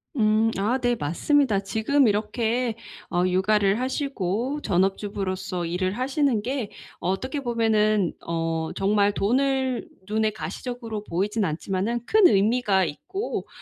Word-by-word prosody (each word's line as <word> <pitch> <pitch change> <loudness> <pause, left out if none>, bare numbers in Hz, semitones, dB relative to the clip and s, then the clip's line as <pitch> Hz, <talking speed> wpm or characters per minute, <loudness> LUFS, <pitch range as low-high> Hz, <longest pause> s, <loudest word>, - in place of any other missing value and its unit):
음. 220 -1 +3
아 215 +6 +1
네. 245 -2 +1
맞습니다. 215 - +1
지금 225 +7 +2
이렇게 225 +3 0 0.3
어 175 0 +1
육아를 200 +3 +2
하시고 260 0 -2
전업주부로서 190 -1 -1
일을 185 +3 -1
하시는 265 -3 +1
게 255 -4 -2 0.3
어떻게 255 - -2
보면은 215 -6 +1
어 165 -1 -1
정말 205 +1 +2
돈을 260 +5 0 0.2
눈에 215 +1 +1
가시적으로 230 -1 -6
보이진 205 +4 -1
않지만은 195 +8 -2
큰 430 -3 +6
의미가 205 - +3
있고 385 - -4
215 Hz, 275 characters per minute, -25 LUFS, 195-250 Hz, 0.3 s, 큰